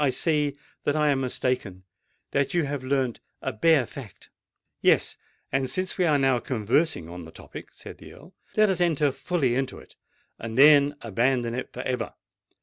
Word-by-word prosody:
"I 140 - +3
see 145 +1 0 0.3
that 145 - 0
I 150 -1 +3
am 135 -2 +1
mistaken—that 125 - -3
you 175 - +3
have 145 -2 -4
learnt 130 -2 -1 0.2
a 130 - -3
bare 140 +4 +4
fact——" 115 -5 -11 0.5
"Yes: - - +3 0.4
and 135 -1 0
since 185 0 -2
we 180 - +1
are 150 -2 +4
now 135 -3 +2
conversing 120 - 0
on 90 +1 -8
the 80 - -12
topic," - - -11
said - - -11
the - - -12
Earl, 165 +7 -16 0.2
"let 215 -2 +5
us 180 -2 -1
enter 150 -4 +2
fully 135 -1 -1
into 135 +1 -2
it - - -15 0.4
and 115 0 -6
then 145 0 +7
abandon 120 +2 0
it 125 - -5
for - - -6
ever. 125 -1 -3
135 Hz, 175 wpm, -26 LUFS, 120-150 Hz, 0.5 s, then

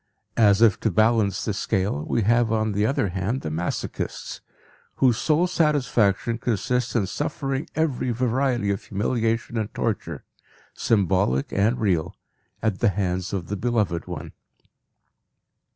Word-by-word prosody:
As 105 -1 +5
if 110 -4 +5
to 110 - +1
balance 110 -1 +2
the 105 - -1
scale, 95 -7 -1
we 115 - +1
have 115 +1 +3
on 110 -1 +1
the 105 +2 +1
other 135 -7 0
hand 95 +8 -2
the 75 - -4
masochists, 85 +3 -4 0.5
whose 125 -4 +3
sole 160 +3 +2
satisfaction 125 - +1
consists 125 +2 -1
in 110 -5 +2
suffering 135 - -3
every 155 -5 0
variety 120 -2 0
of 100 - -3
humiliation 115 +2 -1
and 110 -1 -3
torture, 85 - -2 0.5
symbolic 95 - +1
and 110 +5 +1
real, 90 -7 0 0.5
at 110 -4 0
the 115 - +4
hands 95 -2 -2
of 95 -4 -3
the 105 - -4
beloved 105 -7 -1
one. - - -6
110 Hz, 135 wpm, -24 LUFS, 100-120 Hz, 0.5 s, As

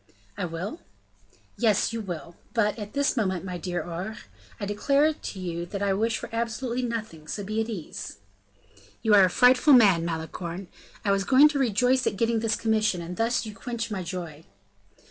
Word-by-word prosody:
"I - - -2
will?" 180 - -5 0.8
"Yes, 220 -2 +2
you 230 - -2
will; 170 -4 -7 0.2
but, 210 -1 +1
at 210 0 -7
this 280 0 +1
moment, 190 -6 -1
my 180 -1 -5
dear 175 0 -3
Aure, 180 +6 -5 0.4
I 205 - -3
declare 280 +9 +2
to 205 - -7
you 170 -2 -3
that 200 +2 -4
I 200 -1 +2
wish 220 +3 0
for - - -6
absolutely 235 +2 -2
nothing, 220 -10 -5
so 205 - -4
be 215 +3 -1
at 225 - -3
ease." 185 - -6 0.9
"You 220 -2 +4
are 200 -2 +8
a - - +1
frightful 250 +7 +5
man, 200 -9 +6
Malicorne; 170 +2 -5 0.4
I 200 - +3
was 195 0 +2
going 275 +7 +6
to 290 -2 -2
rejoice 250 +1 +2
at - - -1
getting 230 +1 +1
this 225 -1 +1
commission, 215 -4 +1
and 170 +1 -6
thus 230 +4 0
you 215 - -7
quench 230 +1 -5
my 195 -3 -2
joy." 170 -3 -6
210 Hz, 185 wpm, -26 LUFS, 180-230 Hz, 0.9 s, are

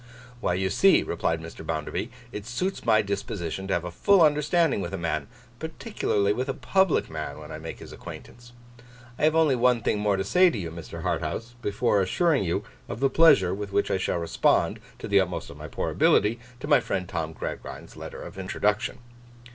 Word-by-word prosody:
'Why, 90 - 0
you 95 0 0
see,' 195 0 +5
replied 80 -1 -1
Mr. 80 0 -9
Bounderby, 80 +8 -3 0.2
'it 105 -1 -7
suits 180 +11 -2
my 110 -1 +5
disposition 100 -2 -4
to 95 - +1
have 85 - -1
a 90 - -5
full 195 - +4
understanding 150 - +3
with 90 +1 -4
a - - -4
man, 85 -3 -2 0.3
particularly 160 - -1
with 130 +5 -3
a 135 - -1
public 190 +3 +2
man, 80 -1 -5
when - - -10
I - - -6
make - - -7
his - - -11
acquaintance. 120 0 -11 0.7
I - - +3
have 155 +1 +3
only 160 -4 +4
one 125 -2 +3
thing 105 - +1
more 105 -2 +1
to 95 - 0
say 180 - +5
to 140 - -4
you, 85 -5 -4
Mr. 85 -1 -8
Harthouse, 115 +2 -2
before 105 0 +1
assuring 145 - +2
you 85 -2 -1 0.3
of 100 - -5
the 135 0 +2
pleasure 100 - +6
with 100 0 -5
which 100 - +1
I 95 - +1
shall 95 - 0
respond, 85 -1 +1 0.2
to - - -7
the 100 -1 +4
utmost 90 -2 -2
of - - -12
my - - -7
poor - - -3
ability, 110 +3 +3 0.2
to 145 - -5
my 145 -1 +6
friend 90 -2 -3
Tom 80 -2 -3
Gradgrind's - - -7
letter - - -8
of - - -9
introduction. 105 +3 0
105 Hz, 205 wpm, -26 LUFS, 90-140 Hz, 0.7 s, pleasure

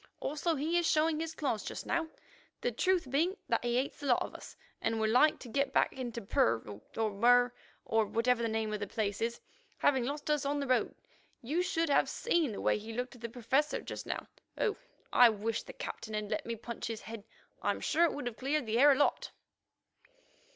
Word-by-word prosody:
Also, 305 +4 -1
he 320 +5 +1
is 340 - +1
showing 310 0 +2
his 325 0 -4
claws 260 -9 -1
just - - -6
now, 335 -1 0 0.5
the 485 +1 0
truth 365 -8 +1
being 340 +8 +1
that - - +1
he 240 0 0
hates 260 +3 -1
the 290 - -5
lot 245 - +4
of - - -8
us, - - -11 0.2
and 225 0 0
would 220 0 +2
like 295 +6 +5
to - - -11
get 275 +4 0
back - - +3
into 240 -3 -5
Purr 115 - +1 0.2
or 220 -1 +1
Mur, 245 +4 +4 0.3
or 225 -1 +2
whatever 235 +3 +2
the 230 - 0
name 220 -1 -1
of 210 - -2
the 205 - -3
place 200 -1 -2
is, 235 +1 -1 0.4
having 265 -3 +3
lost 290 +4 -2
us 300 -2 +1
on 285 +1 0
the 280 - -1
road. 255 -1 +1 0.5
You 305 +9 0
should 330 -3 0
have 280 - +3
seen 340 - +1
the 205 - -5
way - - +2
he 220 +2 -8
looked 250 +2 -3
at 245 - -15
the 235 - -4
Professor 260 +6 0
just - - -7
now. - - -3 0.3
Oh! 420 - +1 0.4
I 245 -1 +8
wish 220 +1 -2
the - - -11
Captain 220 -1 -6
had 210 -1 -3
let 310 - -2
me 230 - -2
punch 235 +1 -6
his 225 -1 -4
head. 225 -2 -8 0.4
I'm - - 0
sure 335 - +2
it 335 - 0
would 285 -2 -5
have 245 -2 -4
cleared 280 +1 0
the 225 +2 0
air 290 +2 +8
a - - +1
lot." 290 - +1
245 Hz, 220 wpm, -32 LUFS, 225-300 Hz, 0.5 s, I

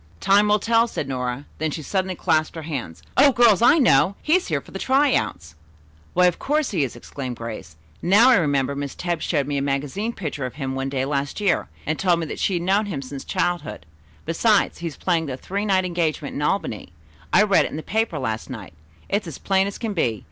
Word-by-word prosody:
"Time 200 - +4
will 210 0 +4
tell," 230 +2 +2
said 150 - -4
Nora. 125 +1 -3
Then 160 +1 0
she 155 +1 -5
suddenly 185 +2 -1
clasped 155 -1 0
her 160 - -6
hands. 135 - -6
"O 280 +1 +7
girls, 235 -6 +5
I 245 - +6
know! 195 - +4
He's 350 +4 +2
here - - 0
for - - -16
the - - -6
try 270 +1 +3
out!" 85 -1 -2 0.6
"Why 180 +1 +5
of 180 - +2
course 300 0 0
he 170 -8 +1
is," 130 - -4
exclaimed 125 +1 -6
Grace. 115 -9 -8 0.3
"Now 210 +8 +6
I 250 - +6
remember 140 -5 +1
Miss 140 -1 -5
Tebbs 175 -2 -2
showed 145 -5 0
me 145 0 -2
a - - -2
magazine 145 - -2
picture 150 - -4
of 125 - -11
him 135 -3 -3
one 135 0 -2
day 135 -1 -1
last 140 +3 -2
year, 200 -4 +1 0.2
and 155 - -2
told 180 -3 +2
me - - -2
that 150 - -6
she 190 - +1
had 170 - -2
known 200 +3 +2
him 145 -9 -4
since 135 +1 -7
childhood. 175 - -2 0.4
Besides, 205 +6 +2
he 170 - -3
is 160 - -7
playing 165 -4 0
a 130 - -4
three 200 +9 -3
night 190 -2 +2
engagement 165 -5 -2
in - - -4
Albany. 145 - -2 0.4
I - - +6
read 200 -2 +4
it - - -3
in - - -6
the 155 - -6
paper 220 -6 -1
last 110 -5 -3
night. 110 -9 -8 0.3
It's 200 -2 -1
as 160 - -7
plain 195 0 +1
as 200 - -6
can 225 -3 -3
be. 115 - 0
165 Hz, 230 wpm, -23 LUFS, 135-200 Hz, 0.6 s, O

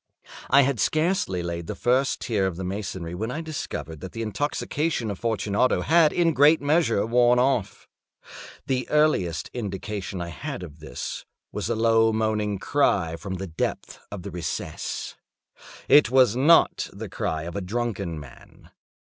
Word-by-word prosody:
I 140 - +6
had 135 -3 0
scarcely 155 - +1
laid 85 -1 -4
the - - -4
first 130 +3 +1
tier 100 -5 0
of 90 -3 -4
my 95 - -4
masonry 95 -3 -4
when 110 +6 -3
I 125 - -4
discovered 145 - -6
that 95 +2 -8
the 115 - -4
intoxication 140 - -2
of 100 - -7
Fortunato 110 +1 +1
had 160 -1 +4
in 170 -1 +2
a - - 0
great 150 +3 +5
measure 145 -7 +2
worn 120 +1 +4
off. 125 -6 0 0.8
The 130 -1 -2
earliest 95 - +1
indication 100 -3 -4
I 85 -1 -4
had 80 +3 -6
of 80 -3 -11
this 80 - -6 0.3
was - - -3
a 115 - +1
low 115 0 +4
moaning 110 -2 0
cry 95 - +1
from 95 +2 -6
the 95 +1 -5
depth 80 -3 -4
of 100 -4 -6
the 100 - -6
recess. 85 -2 -5 0.7
It 145 -4 +6
was 125 -3 +4
not 150 +6 +4
the - - -7
cry 80 -1 -3
of 85 +1 -7
a 100 - -2
drunken 100 -5 -3
man. 70 -4 -15
110 Hz, 165 wpm, -25 LUFS, 90-130 Hz, 0.8 s, I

